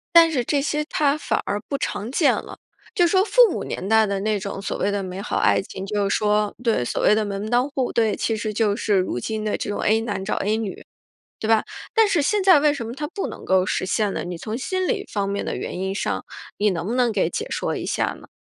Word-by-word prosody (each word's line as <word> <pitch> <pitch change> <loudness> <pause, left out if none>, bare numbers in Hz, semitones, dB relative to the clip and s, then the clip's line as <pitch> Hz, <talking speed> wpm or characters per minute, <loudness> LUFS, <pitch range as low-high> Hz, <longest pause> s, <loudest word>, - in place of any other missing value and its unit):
但 330 -1 +8
是 250 -5 0
这 285 +2 +1
些 300 +1 -1
它 295 -1 +1
反 - - -1
而 205 - -1
不 280 - -2
常 220 -4 -3
见 285 +3 +3
了。 - - -6 0.4
就 355 -4 +4
说 375 +3 +3
父 480 -2 +5
母 - - -3
年 190 - -4
代 220 0 +5
的 200 -1 -1
那 215 0 0
种 195 0 -5
所 200 - -3
谓 200 - 0
的 200 -1 -1
美 185 +1 -6
好 - - -3
爱 - - +3
情， 190 0 -7
就 200 0 -1
是 - - +2
说 210 -1 +1
对， 225 - +1
所 - - -2
谓 - - +6
的 215 0 +1
门 200 +1 -4
当 245 +3 +2
户 265 -3 -1
对， 225 -2 +2
其 225 - -1
实 215 0 -3
就 210 -1 +1
是 210 - +1
如 185 -9 0
今 215 - -3
的 215 - -1
这 - - -4
种 205 - -2
A 220 +1 +3
男 205 -4 -3
找 195 - -1
A 210 +2 0
女， 220 -4 -5 0.6
对 220 - -3
吧？ 225 -1 +4 0.3
但 445 -2 +5
是 340 -6 +2
现 405 +6 +1
在 370 -6 +7
为 300 0 +4
什 245 -6 -5
么 230 - -6
它 295 +2 -4
不 390 +4 -4
能 - - -8
够 185 -1 +3
实 - - -1
现 205 +1 0
呢？ - - -2
你 175 -1 -6
从 215 +6 -4
心 370 +8 -2
理 405 -2 -1
方 200 -2 -1
面 200 0 -2
的 - - -3
原 180 - -5
因 190 0 -1
上， 200 - -2 0.3
你 210 0 +3
能 175 -2 -3
不 230 - -1
能 250 -2 +3
给 205 -3 +1
解 470 0 -4
说 - - -2
一 - - -4
下 - - -1
呢？ - - -15
220 Hz, 285 characters per minute, -23 LUFS, 200-285 Hz, 0.6 s, 但